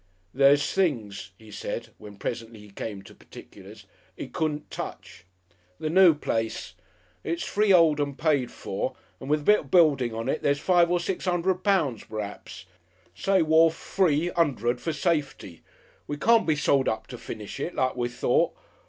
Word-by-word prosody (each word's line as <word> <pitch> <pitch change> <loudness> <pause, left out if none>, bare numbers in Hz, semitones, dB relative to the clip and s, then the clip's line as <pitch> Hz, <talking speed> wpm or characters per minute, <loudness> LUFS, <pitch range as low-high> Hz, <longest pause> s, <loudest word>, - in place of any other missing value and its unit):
"There's 140 +2 +4
things," 115 - -1
he 110 -1 -15
said, - - -5
when 105 -1 -11
presently 115 +1 -5
he 105 -1 -15
came 100 -1 -6
to - - -14
particulars, - - -14 0.3
"'e - - -7
couldn't 150 -1 -3
touch. - - -8 0.5
The 155 - -2
noo 180 -2 +6
place! 115 -6 -3 0.5
It's 170 +1 -3
freehold 180 -7 +3
and 140 -1 -2
paid 145 -5 +1
for, - - -4 0.2
and 135 - -8
with 150 0 +2
the - - -13
bit 210 0 +5
of 140 - -11
building 140 -8 +4
on 115 +1 -5
it, 155 - -1
there's 140 0 +1
five 175 0 +3
or 175 0 +2
six 185 +2 -4
'undred 180 +1 0
pound 160 - 0
p'raps 105 -3 -7 0.5
say 195 -3 +2
worf 160 +1 +4
free 170 -2 0
'undred, 125 -7 0
for 165 - -2
safety. 150 - -2 0.5
We 145 - -4
can't 230 +6 +3
be 155 - +3
sold 140 -2 +2
up 110 - -3
to - - -9
finish 105 +5 -8
it, 170 +5 -4
like 130 0 0
we 120 -1 -2
thought. 120 - +1
145 Hz, 170 wpm, -26 LUFS, 120-170 Hz, 0.5 s, noo